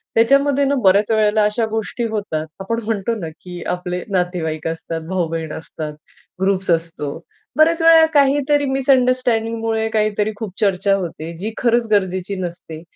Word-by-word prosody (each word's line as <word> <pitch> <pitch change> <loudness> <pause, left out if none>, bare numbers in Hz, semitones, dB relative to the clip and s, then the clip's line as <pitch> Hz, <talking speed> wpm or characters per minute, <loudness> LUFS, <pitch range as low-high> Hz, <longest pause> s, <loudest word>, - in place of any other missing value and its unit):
त्याच्यामध्ये 275 +4 +3
ना 280 +1 +1
बऱ्याच 200 +3 +4
वेळेला 215 -1 +3
अशा 210 +2 +1
गोष्टी 225 +2 -3
होतात. 200 -8 -3
आपण 230 +4 -2
म्हणतो 225 +1 -1
ना, 165 -4 -5
की 180 -1 -8
आपले 180 0 -3
नातेवाईक 175 -4 -1
असतात, 165 0 -4
भाऊ-बहीण 165 -4 -2
असतात, 155 -1 -6 0.5
ग्रुप्स 190 -1 +1
असतो. 165 -3 -1 0.4
बऱ्याच 325 +2 +4
वेळेला 325 0 +7
काहीतरी 285 0 +3
मिसअंडरस्टँडिंगमुळे 240 -4 +1
काहीतरी 215 -1 0
खूप 210 -2 -6
चर्चा 195 -1 +2
होते, 170 -3 -5
जी 210 +6 -4
खरंच 235 -1 +2
गरजेची 190 -1 0
नसते. 170 -3 -7
210 Hz, 140 wpm, -19 LUFS, 180-235 Hz, 0.5 s, वेळेला